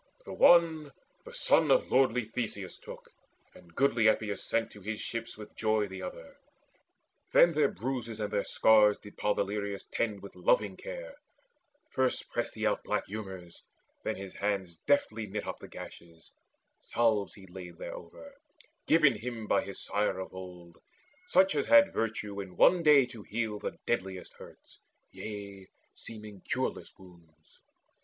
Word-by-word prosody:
The - - -7
one 160 -4 +5 0.3
the 480 - -11
son - - +3
of - - +3
lordly 125 -3 +3
Theseus 110 -4 -5
took, - - -11 0.4
And 85 -1 -18
goodly 120 -5 +3
Epeius 110 -2 +1
sent 115 0 -1
to 105 - -13
his 110 +2 -4
ship 115 0 -4
with 105 -1 -11
joy 110 -1 +1
The 95 -1 -8
other. 85 -3 -8 1.0
Then 170 - +7
their 145 -2 +3
bruises 120 -3 -4
and 105 -1 -3
their 100 - +1
scars 105 -2 +5
Did 105 - -14
Podaleirius 100 -1 -1
tend 105 -4 -2
with 100 - -10
loving - - +2
care. - - -8 0.7
First 130 -1 0
pressed - - -2
he - - -2
out - - +1
black - - -1
humours, 95 -4 -8 0.4
then - - -2
his 95 -1 -8
hands 100 -4 -2
Deftly 115 -6 +1
knit 105 +1 -4
up - - -5
the - - -10
gashes: 85 -2 -12 0.5
salves 110 -4 0
he 95 - -13
laid 90 -2 -10
Thereover, 280 - -9 0.6
given 155 -4 +5
him 115 0 -5
by 100 - +2
his 100 - -7
sire 100 -2 0
of 95 - -6
old, 90 -2 -10 0.5
Such 290 -4 +4
as - - 0
had 290 0 +6
virtue 105 -2 -2
in 95 -2 -10
one 180 -1 +6
day 150 -4 +6
to 120 -3 -11
heal 110 0 -3
The - - -5
deadliest 95 -5 -2
hurts, - - -15 0.3
yea, 100 -3 -8 0.3
seeming 105 -3 -10
cureless - - -3
wounds. 85 -4 -20
105 Hz, 155 wpm, -30 LUFS, 95-125 Hz, 1.0 s, Then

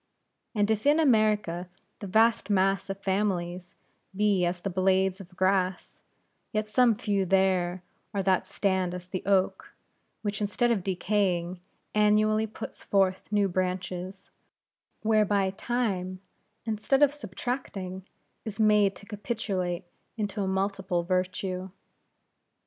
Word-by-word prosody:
And 205 0 +2
if 220 +5 0
in 295 +2 +5
America 215 - +2 0.3
the 200 - -6
vast 220 +3 +3
mass 195 0 +2
of 195 - -3
families 185 -3 -2 0.4
be 200 -3 +2
as 175 0 -2
the 195 - -3
blades 190 +1 +2
of 180 -1 -15
grass, 185 -1 0 0.5
yet 215 0 -1
some 235 +1 +4
few 205 -3 0
there 185 -1 +1 0.3
are 200 -2 -1
that 190 -1 +2
stand 190 -3 0
as 180 0 -8
the 185 0 -4
oak; 195 -2 +1 0.5
which, 210 0 -2
instead 210 +4 +1
of 215 -5 +1
decaying, 185 -2 0 0.3
annually 215 +1 +3
puts 215 - -8
forth 190 0 +1
new 205 -1 +3
branches; 185 +1 -3 0.7
whereby 210 -3 +3
Time, 195 -4 -2 0.5
instead 225 +6 +2
of 290 -1 +5
subtracting, 195 -6 -5 0.4
is 220 0 -6
made 210 -2 +4
to 200 - -13
capitulate 200 -5 -3 0.3
into 205 -1 -2
a 195 - -1
multiple 190 -2 -1
virtue. 185 +1 -2
195 Hz, 125 wpm, -28 LUFS, 185-210 Hz, 0.7 s, in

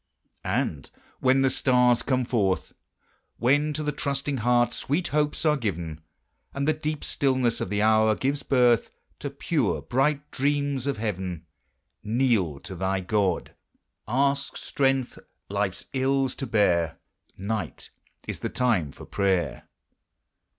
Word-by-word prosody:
And 70 -4 -1 0.3
when 135 +1 +4
the 135 - +3
stars 125 -2 +3
come 130 -1 0
forth, 100 -7 0 0.6
When 145 +5 +3
to 155 +1 -3
the 150 - 0
trusting 140 0 -2
heart 120 0 +2
sweet 155 +9 -1
hopes 150 +2 0
are 150 -1 +5
given, 85 - -3 0.5
And 140 +1 -1
the 155 - +4
deep 155 -1 -3
stillness 130 -4 +1
of - - -2
the 105 +1 +1
hour 110 0 +4
gives 140 +4 -1
birth 125 -4 +3 0.3
To - - -4
pure, - - 0
bright 145 +3 0
dreams 140 -1 0
of 140 - 0
heaven, 95 -6 -3 0.6
Kneel 110 - +1
to - - -8
thy 95 +1 -1
God 95 -2 0 0.5
ask 140 +4 +1
strength, 135 -2 0 0.3
life's 100 -2 -2
ills 135 0 +1
to 135 - -5
bear: 90 -8 +2 0.4
Night 105 +3 -4 0.4
is - - -4
the - - -3
time 110 - +1
for - - -12
prayer! 95 -3 0
125 Hz, 135 wpm, -26 LUFS, 100-140 Hz, 0.6 s, are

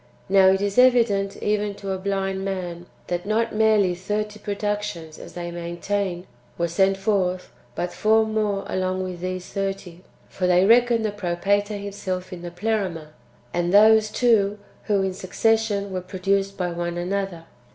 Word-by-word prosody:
Now, 190 -1 +6
it 190 +1 +4
is 200 +3 +1
evident 230 -6 +4
even 210 -1 0
to 200 -1 -5
a 190 - -2
blind 195 0 -2
man, 180 -3 -4 0.2
that 175 +2 -3
not 225 +2 0
merely 215 -4 +3
thirty 210 +3 -3
productions, 205 -6 -4
as - - -11
they 175 -1 -5
maintain, 175 +2 -3 0.3
were 170 - 0
sent 190 +3 +2
forth, 190 -2 0 0.2
but 175 - -3
four 220 +1 +3
more 215 -2 -1
along 185 0 -1
with 180 -2 -5
these 185 0 -4
thirty. 195 -3 -4 0.3
For 185 - -2
they 180 +1 +4
reckon 235 +1 +4
the 215 - 0
Propator 205 +2 0
himself 190 -2 -5
in 175 - -8
the 175 - -6
Pleroma, 180 -4 -2 0.4
and 175 0 0
those 215 +2 +6
too, 210 -3 +2 0.3
who 200 -3 +2
in 190 -1 -1
succession 205 +2 0
v/ere 185 -1 -3
produced 195 +2 -1
by 180 -2 -1
one 175 0 -3
another. 180 -1 -3
195 Hz, 160 wpm, -23 LUFS, 180-210 Hz, 0.4 s, Now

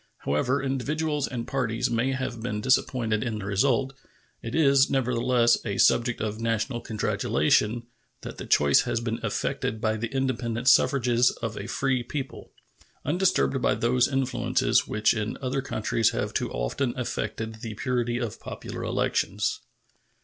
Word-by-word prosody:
However 125 - +1
individuals 145 +2 -1
and 120 -2 -4
parties 125 -2 -1
may 120 +3 +1
have 130 -3 -4
been 110 -3 -3
disappointed 115 -2 +1
in 115 -3 -3
the 100 - -6
result, 130 +6 +1 0.5
it 115 - -5
is, 140 -3 +4
nevertheless, 125 -2 +2
a 100 -3 -3
subject 120 0 +3
of 110 0 -3
national 115 +2 -1
congratulation 110 - +1 0.4
that - - -8
the - - -6
choice 70 -1 +5
has - - -1
been 115 -1 -3
effected 110 - -2
by 110 -1 0
the 115 +2 -2
independent 125 -2 -2
suffrages 125 -2 +4
of 115 -1 -2
a 100 - -6
free 130 +1 0
people, 135 +3 -6 0.5
undisturbed 150 - +1
by - - +2
those 125 +1 +2
influences 135 -1 +1
which 110 0 +2
in 110 -1 -3
other 135 +1 -2
countries 110 -3 0
have - - -2
too - - -1
often 90 - -2
affected 110 -2 -4
the 110 -2 -6
purity 120 +1 -1
of 120 -3 -4
popular - - -7
elections. - - -1
120 Hz, 150 wpm, -26 LUFS, 110-130 Hz, 0.5 s, choice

